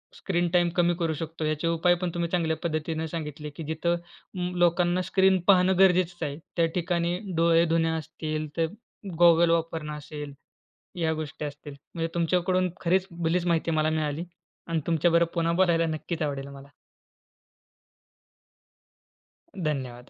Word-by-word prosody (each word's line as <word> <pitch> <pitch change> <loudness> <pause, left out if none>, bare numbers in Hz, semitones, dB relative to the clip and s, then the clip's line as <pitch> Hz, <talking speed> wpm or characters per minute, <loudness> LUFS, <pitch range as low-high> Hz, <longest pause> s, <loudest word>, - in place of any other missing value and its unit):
Screen 175 -2 -1
time 175 -1 +4
कमी 175 0 +4
करू 165 -2 0
शकतो 160 +1 -5
याचे 155 +2 -1
उपाय 170 +2 +3
पण 180 - 0
तुम्ही 170 -1 -1
चांगल्या 160 -3 0
पद्धतीने 160 0 -2
सांगितले 150 -2 -6
की 165 - -5
जिथं 160 +3 -1 0.6
लोकांना 175 +1 +3
स्क्रीन 190 +1 +3
पाहणं 185 -1 +5
गरजेचच 180 -2 +3
आहे. 145 0 -3 0.2
त्या 170 - +4
ठिकाणी 175 0 0 0.2
डोळे 165 0 +4
धुणे 165 0 +2
असतील 155 -1 -3
तर 165 - +3 0.5
गॉगल 170 -1 +6
वापरणं 165 -2 -1
असेल, 150 -1 -8 0.7
या 160 -1 +2
गोष्टी 155 -1 -5
असतील. 145 0 -8 0.2
म्हणजे 165 0 -1
तुमच्याकडून 180 +2 +1
खरीच 185 +2 +2
भलीच 170 +1 -1
माहिती 165 -1 +1
मला 155 0 +2
मिळाली 155 0 -1 0.4
आणि 165 -1 0
तुमच्याबरोबर 170 +1 +3
पुन्हा 170 0 +1
बोलायला 170 -2 +3
नक्कीच 160 +1 -4
आवडेल 140 -2 -3
मला. 140 0 -12 2.9
धन्यवाद. 130 -7 -3
165 Hz, 135 wpm, -27 LUFS, 155-175 Hz, 2.9 s, गॉगल